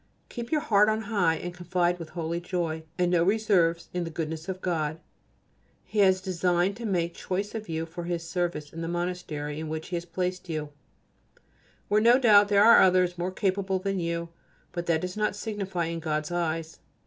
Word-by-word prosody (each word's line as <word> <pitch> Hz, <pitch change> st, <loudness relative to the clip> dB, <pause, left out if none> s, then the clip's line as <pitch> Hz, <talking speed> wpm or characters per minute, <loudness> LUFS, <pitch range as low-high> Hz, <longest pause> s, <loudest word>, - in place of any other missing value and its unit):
Keep 235 Hz, -1 st, -6 dB
your 305 Hz, -2 st, +2 dB
heart 210 Hz, -7 st, +4 dB
on 215 Hz, 0 st, 0 dB
high 200 Hz, -6 st, +1 dB
and 175 Hz, +2 st, -5 dB
confide 180 Hz, 0 st, 0 dB
with 165 Hz, -2 st, -7 dB
holy 170 Hz, +1 st, -2 dB
joy, 170 Hz, -3 st, -2 dB, 0.2 s
and 180 Hz, -1 st, +2 dB
no 175 Hz, -2 st, +3 dB
reserves, 185 Hz, -4 st, +2 dB
in 180 Hz, -1 st, -1 dB
the 165 Hz, -, -4 dB
goodness 160 Hz, +1 st, -4 dB
of 185 Hz, -1 st, -3 dB
God. 160 Hz, -4 st, -1 dB, 0.9 s
He 215 Hz, -, -3 dB
has 190 Hz, -2 st, +5 dB
designed 180 Hz, 0 st, +1 dB
to 235 Hz, -1 st, -4 dB
make 175 Hz, -3 st, 0 dB
choice 200 Hz, +4 st, -3 dB
of 220 Hz, -4 st, -6 dB
you 160 Hz, 0 st, -2 dB
for 170 Hz, +1 st, -7 dB
His 170 Hz, -1 st, -3 dB
service 175 Hz, -5 st, -2 dB
in 165 Hz, -, -6 dB
the 165 Hz, -, -3 dB
Monastery 170 Hz, -4 st, -3 dB
in 160 Hz, -1 st, -5 dB
which 160 Hz, 0 st, -5 dB
He 180 Hz, -, -2 dB
has 170 Hz, -, -5 dB
placed 180 Hz, +1 st, -3 dB
you: 155 Hz, -2 st, -3 dB, 1.2 s
where 210 Hz, +1 st, +3 dB
no 235 Hz, +3 st, +6 dB
doubt 210 Hz, -5 st, +6 dB
there 205 Hz, 0 st, +5 dB
are 230 Hz, -, +8 dB
others 180 Hz, -1 st, +3 dB
more 180 Hz, +2 st, -1 dB
capable 190 Hz, 0 st, 0 dB
than 195 Hz, 0 st, -2 dB
you, 170 Hz, 0 st, -2 dB, 0.4 s
but 175 Hz, -1 st, -5 dB
that 160 Hz, -2 st, +2 dB
does 180 Hz, 0 st, -4 dB
not 210 Hz, -1 st, 0 dB
signify 195 Hz, -5 st, -3 dB
in 165 Hz, 0 st, -3 dB
God's 155 Hz, -1 st, -2 dB
eyes. 165 Hz, -2 st, -2 dB
175 Hz, 195 wpm, -27 LUFS, 165-195 Hz, 1.2 s, are